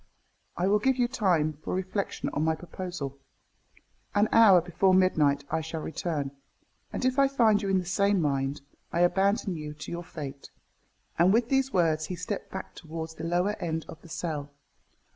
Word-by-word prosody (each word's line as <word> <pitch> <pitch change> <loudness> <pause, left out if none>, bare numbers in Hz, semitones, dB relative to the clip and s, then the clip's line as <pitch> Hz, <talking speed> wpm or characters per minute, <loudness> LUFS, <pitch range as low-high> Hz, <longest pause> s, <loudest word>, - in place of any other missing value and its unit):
I 175 - +1
will 205 +2 +3
give 265 +4 +2
you 245 -1 +3
time 180 -11 +1
for - - -2
reflection 190 +2 -2
on 150 - 0
my 160 0 +2
proposal. 175 -5 -6 1.0
An 205 +1 +4
hour 215 -5 +7
before 185 +2 +2
midnight 150 -7 +3
I 160 - +1
shall 160 0 -5
return, 155 -4 -3 0.6
and - - -3
if 255 +1 +2
I 275 - +6
find 225 -6 +3
you 200 - -2
in 190 - +3
the 180 - -1
same 200 +2 +2
mind, 140 -2 0 0.3
I 170 - +1
abandon 190 +1 +2
you 150 -1 -6
to 150 - -8
your 175 0 -4
fate." 140 -4 -8 0.7
And 175 +2 +6
with 230 +3 +2
these 270 0 +2
words 160 -5 +2
he 180 - -4
stepped 180 +1 -5
back 190 - -6
towards 160 0 -7
the - - -9
lower 175 +5 +1
end 160 -1 -2
of 160 - -11
the 170 - -15
cell. 155 -2 -4
175 Hz, 180 wpm, -28 LUFS, 155-200 Hz, 1.0 s, hour